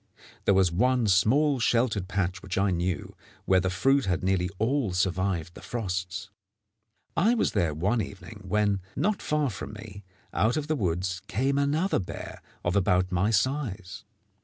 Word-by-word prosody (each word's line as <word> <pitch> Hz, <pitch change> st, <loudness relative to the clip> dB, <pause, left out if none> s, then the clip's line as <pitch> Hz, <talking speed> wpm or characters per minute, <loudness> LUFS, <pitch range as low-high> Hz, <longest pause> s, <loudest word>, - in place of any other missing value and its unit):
There 100 Hz, -, +4 dB
was 95 Hz, -3 st, +4 dB
one 125 Hz, +7 st, +2 dB
small 125 Hz, +9 st, +3 dB
sheltered 115 Hz, -5 st, +1 dB
patch 95 Hz, -2 st, -1 dB
which 95 Hz, 0 st, -5 dB
I 100 Hz, 0 st, +2 dB
knew, 90 Hz, +1 st, -2 dB, 0.3 s
where 95 Hz, -1 st, +4 dB
the 95 Hz, +1 st, 0 dB
fruit 135 Hz, +9 st, +2 dB
had 90 Hz, -1 st, -1 dB
nearly 90 Hz, -1 st, +1 dB
all 115 Hz, -2 st, 0 dB
survived 90 Hz, -2 st, 0 dB
the -, -, -12 dB
frosts. 95 Hz, -3 st, -4 dB, 0.8 s
I 220 Hz, +8 st, +3 dB
was 225 Hz, -, +1 dB
there 85 Hz, -7 st, 0 dB
one 100 Hz, +9 st, +1 dB
evening, 100 Hz, +1 st, -9 dB
when, 105 Hz, 0 st, +1 dB
not 200 Hz, +8 st, 0 dB
far 150 Hz, -4 st, 0 dB
from 100 Hz, -, -7 dB
me, 105 Hz, -1 st, -10 dB, 0.3 s
out 115 Hz, +7 st, +2 dB
of 150 Hz, -, -1 dB
the 155 Hz, +1 st, 0 dB
woods 95 Hz, -, -1 dB
came 135 Hz, +7 st, 0 dB
another 150 Hz, +7 st, +1 dB
bear 90 Hz, -, -7 dB, 0.2 s
of 90 Hz, +2 st, +1 dB
about 90 Hz, -2 st, +2 dB
my 95 Hz, +3 st, +2 dB
size. 105 Hz, -4 st, -1 dB
100 Hz, 160 wpm, -27 LUFS, 95-125 Hz, 0.8 s, There